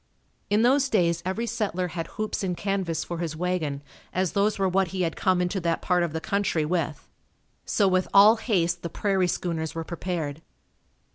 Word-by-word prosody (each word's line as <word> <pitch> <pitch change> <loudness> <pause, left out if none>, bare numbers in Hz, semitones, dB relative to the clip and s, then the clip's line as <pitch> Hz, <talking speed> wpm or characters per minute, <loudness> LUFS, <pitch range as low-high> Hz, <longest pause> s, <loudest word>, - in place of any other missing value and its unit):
In 210 +2 +3
those 270 +2 +4
days 170 -6 +2
every 215 +5 -1
settler 200 -6 -2
had 165 -1 -4
hoops 215 -1 -2
and 180 -2 -2
canvas 195 -5 -1
for 170 -1 -5
his 165 -3 -3
wagon, 160 -5 -2 0.3
as 185 -1 0
those 205 +1 +1
were 195 -1 +2
what 190 +1 +2
he 185 +1 -2
had 165 - -1
come 185 -2 +2
into 180 +2 -1
that 170 -1 -1
part 180 -1 +2
of 170 -2 0
the 160 - -3
country 195 -4 0
with. 165 -2 -2 0.6
So 200 - +2
with 185 0 +2
all 210 +3 +7
haste 175 -6 0
the 170 - -4
"prairie 190 +1 +1
schooners" 165 -3 -2
were 165 - -3
prepared. 165 -3 -4
180 Hz, 190 wpm, -26 LUFS, 165-200 Hz, 0.6 s, all